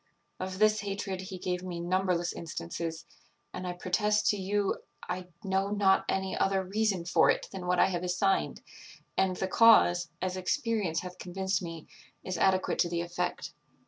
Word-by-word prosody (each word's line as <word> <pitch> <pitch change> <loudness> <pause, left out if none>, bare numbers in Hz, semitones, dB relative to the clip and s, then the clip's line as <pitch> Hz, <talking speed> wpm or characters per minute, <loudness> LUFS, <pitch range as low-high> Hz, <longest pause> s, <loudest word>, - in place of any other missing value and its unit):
Of 185 0 -4
this 215 +1 +4
hatred 195 -2 -3
he 185 0 -7
gave 180 0 -2
me 180 -2 -5
numberless 180 0 0
instances, 160 - -5 0.5
and 180 - -5
I 180 - -2
protest 210 +4 +1
to 205 - -2
you 200 +1 0 0.3
I 180 0 -4 0.2
know 195 0 0
not 200 -2 +3
any 190 0 -1
other 195 0 +1
reason 195 -2 0
for 175 - +4
it - - +1
than 185 -2 -6
what 180 0 +2
I - - +6
have 175 -2 -2
assigned; 180 +2 0 0.5
and 190 -1 +2
the 190 - -2
cause, 180 -5 +5
as 185 0 -2
experience 200 - 0
hath 180 0 -9
convinced 190 0 -2
me, 165 -3 -7 0.4
is 185 -2 -3
adequate 190 -1 +2
to 170 - +3
the 170 0 -1
effect. 175 +1 -3
185 Hz, 170 wpm, -30 LUFS, 180-195 Hz, 0.5 s, I